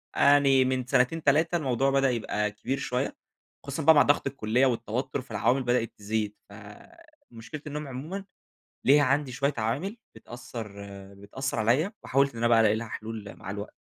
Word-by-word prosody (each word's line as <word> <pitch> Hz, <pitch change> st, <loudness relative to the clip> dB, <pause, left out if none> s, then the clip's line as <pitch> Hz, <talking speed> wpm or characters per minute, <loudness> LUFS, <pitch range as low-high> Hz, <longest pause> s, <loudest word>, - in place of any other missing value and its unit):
آآ -, -, -3 dB
يعني 135 Hz, -2 st, +4 dB
من 130 Hz, -1 st, -1 dB
سنتين، 130 Hz, +7 st, +2 dB
3 160 Hz, +5 st, +3 dB
الموضوع 135 Hz, -3 st, +1 dB
بدأ 135 Hz, -1 st, +3 dB
يبقى 105 Hz, -3 st, -1 dB
كبير 125 Hz, +6 st, -3 dB
شويّة، 130 Hz, 0 st, -2 dB, 0.5 s
خصوصًا 140 Hz, +3 st, -4 dB
بقى 160 Hz, +1 st, +7 dB
مع 145 Hz, -, +7 dB
ضغط 145 Hz, -1 st, +2 dB
الكلّية 125 Hz, -1 st, +1 dB
والتوتّر 125 Hz, +2 st, -2 dB
فالعوامل 125 Hz, +2 st, 0 dB
بدأت 120 Hz, -2 st, 0 dB
تزيد؛ 105 Hz, 0 st, -1 dB, 0.2 s
فمشكلة 140 Hz, -, -12 dB
النوم 150 Hz, 0 st, -5 dB
عمومًا 155 Hz, +10 st, -6 dB, 0.6 s
ليها 145 Hz, +2 st, +6 dB
عندي 140 Hz, 0 st, +1 dB
شويّة 140 Hz, +3 st, 0 dB
عوامل 145 Hz, -, -2 dB, 0.2 s
بتأثر 115 Hz, -2 st, -8 dB, 0.4 s
بتأثر 110 Hz, +6 st, -4 dB
عليَّ 130 Hz, -, +2 dB
وحاولت 140 Hz, +1 st, +2 dB
إن 115 Hz, -, -11 dB
أنا 120 Hz, -, +2 dB
بقى 115 Hz, -1 st, +5 dB
ألاقي 110 Hz, -1 st, +4 dB
لها 115 Hz, +1 st, -4 dB
حلول 110 Hz, -2 st, -7 dB
مع 95 Hz, -, -7 dB
الوق 100 Hz, +1 st, -6 dB
130 Hz, 165 wpm, -27 LUFS, 110-140 Hz, 0.6 s, بقى